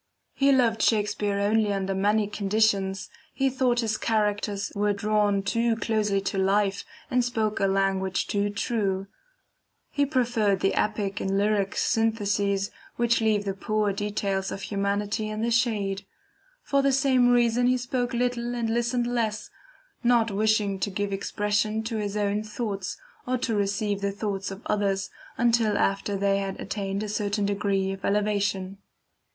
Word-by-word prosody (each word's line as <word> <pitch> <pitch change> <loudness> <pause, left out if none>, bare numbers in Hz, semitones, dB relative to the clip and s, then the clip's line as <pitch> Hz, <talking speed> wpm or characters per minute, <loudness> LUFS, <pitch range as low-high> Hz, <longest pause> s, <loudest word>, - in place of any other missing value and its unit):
"He 275 0 +3
loved 235 -4 +3
Shakspeare 210 -2 +1
only 210 +1 +2
under 195 -1 -1
many 205 +2 +2
conditions. 200 -2 0 0.3
He 270 -1 +1
thought 250 -2 +1
his 215 -2 -1
characters 205 -2 -1
were 205 0 +1
drawn 205 -1 +1
too 230 +3 +1
closely 215 -3 0
to 195 0 -2
the - - +2
life, 200 0 +1 0.3
and 250 -1 +3
spoke 220 -3 -1
a 195 - +2
language 195 -1 0
too 205 0 0
true; 200 -2 -1 0.9
he 285 -1 +1
preferred 235 -8 +1
the 195 - +2
epic 210 -2 -1
and 195 0 0
lyric 200 -1 +1
syntheses 205 -3 +1 0.2
which 235 -1 +2
leave 215 -2 +2
the 195 - -1
poor 210 +1 0
details 200 -1 -2
of 195 - -6
humanity 205 +1 -1
in 215 +1 -3
the 235 - 0
shade. 210 -5 0 0.6
For 280 -1 +2
the 275 0 +3
same 260 -2 +3
reason 245 0 +3
he 255 0 +3
spoke 245 0 -2
little 245 0 -1
and 230 -2 -1
listened 240 +1 0
less, 230 -3 -2 0.5
not 235 -2 +3
wishing 210 -1 +1
to 195 - -1
give 200 +1 -2
expression 210 +2 -1
to 225 0 -3
his 210 -1 -2
own 205 0 0
thoughts, 210 -3 -4 0.3
or 255 0 +1
to 245 -2 -2
receive 205 0 0
the 200 0 0
thoughts 200 -1 -3
of 195 +2 -9
others, 195 -2 0 0.3
until 230 -3 +2
after 195 0 0
they 200 0 +2
had 195 -1 -4
attained 200 0 -3
a - - -3
certain 205 0 -1
degree 200 -1 0
of 195 0 -7
elevation." 200 -2 0
210 Hz, 155 wpm, -26 LUFS, 200-225 Hz, 0.9 s, He